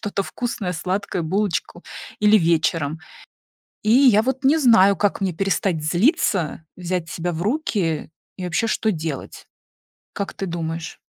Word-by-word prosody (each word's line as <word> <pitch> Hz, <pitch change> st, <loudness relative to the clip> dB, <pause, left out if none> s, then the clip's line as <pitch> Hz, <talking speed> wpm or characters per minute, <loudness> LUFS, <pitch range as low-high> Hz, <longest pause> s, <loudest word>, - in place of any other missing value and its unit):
что-то 205 Hz, -1 st, -2 dB
вкусное- 230 Hz, -6 st, -4 dB
сладкое, 180 Hz, +1 st, -2 dB
булочку, 180 Hz, 0 st, -2 dB, 0.4 s
или 210 Hz, +1 st, +6 dB
вечером. 160 Hz, -2 st, +1 dB, 0.8 s
И 215 Hz, -, 0 dB
я 240 Hz, -4 st, +6 dB
вот 265 Hz, +2 st, -2 dB
не 290 Hz, +4 st, +4 dB
знаю, 225 Hz, -, +5 dB
как 205 Hz, +1 st, 0 dB
мне 190 Hz, -2 st, 0 dB
перестать 190 Hz, -2 st, -1 dB
злиться, 175 Hz, -, +1 dB
взять 180 Hz, -2 st, -3 dB
себя 175 Hz, +2 st, -3 dB
в 165 Hz, +2 st, -4 dB
руки 200 Hz, -, -1 dB, 0.3 s
и 185 Hz, -, -5 dB
вообще 180 Hz, +6 st, 0 dB
что 220 Hz, 0 st, 0 dB
делать. 155 Hz, -4 st, -6 dB, 0.7 s
Как 200 Hz, -, -4 dB
ты 195 Hz, -, -5 dB
думаешь? 165 Hz, -1 st, -5 dB
185 Hz, 140 wpm, -22 LUFS, 165-215 Hz, 0.8 s, или